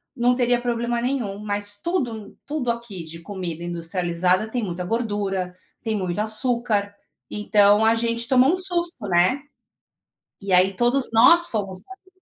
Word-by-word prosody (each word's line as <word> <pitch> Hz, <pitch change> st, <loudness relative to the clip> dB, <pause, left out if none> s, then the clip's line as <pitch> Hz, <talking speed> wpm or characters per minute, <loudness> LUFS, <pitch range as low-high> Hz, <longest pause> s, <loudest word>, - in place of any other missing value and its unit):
não 245 Hz, 0 st, +2 dB
teria 245 Hz, -1 st, +1 dB
problema 240 Hz, 0 st, -1 dB
nenhum, 240 Hz, -6 st, -2 dB
mas 205 Hz, -1 st, -1 dB
tudo 340 Hz, -9 st, -1 dB
m 210 Hz, -2 st, -12 dB
tudo 285 Hz, -4 st, -3 dB
aqui 235 Hz, -7 st, -4 dB
de 160 Hz, +1 st, -9 dB
comida 170 Hz, -2 st, -6 dB
industrializada, 175 Hz, +3 st, 0 dB
tem 245 Hz, -2 st, -2 dB
muita 180 Hz, -2 st, -4 dB
gordura, 200 Hz, -4 st, -2 dB, 0.2 s
tem 220 Hz, -2 st, -2 dB
muito 185 Hz, -1 st, -3 dB
açúcar, 215 Hz, -2 st, +1 dB, 0.4 s
então 210 Hz, 0 st, +3 dB
a 225 Hz, +1 st, +4 dB
gente 235 Hz, 0 st, -1 dB
tomou 260 Hz, +5 st, +4 dB
um -, -, 0 dB
susto, 345 Hz, -4 st, -2 dB
né, 180 Hz, +10 st, +2 dB, 1.0 s
e 195 Hz, -1 st, -5 dB
aí 185 Hz, +2 st, +4 dB
todos 245 Hz, +4 st, +1 dB
nós 340 Hz, +10 st, +6 dB
fomos 195 Hz, -4 st, -3 dB
aplicando. 380 Hz, 0 st, -14 dB
215 Hz, 150 wpm, -23 LUFS, 190-245 Hz, 1.0 s, nós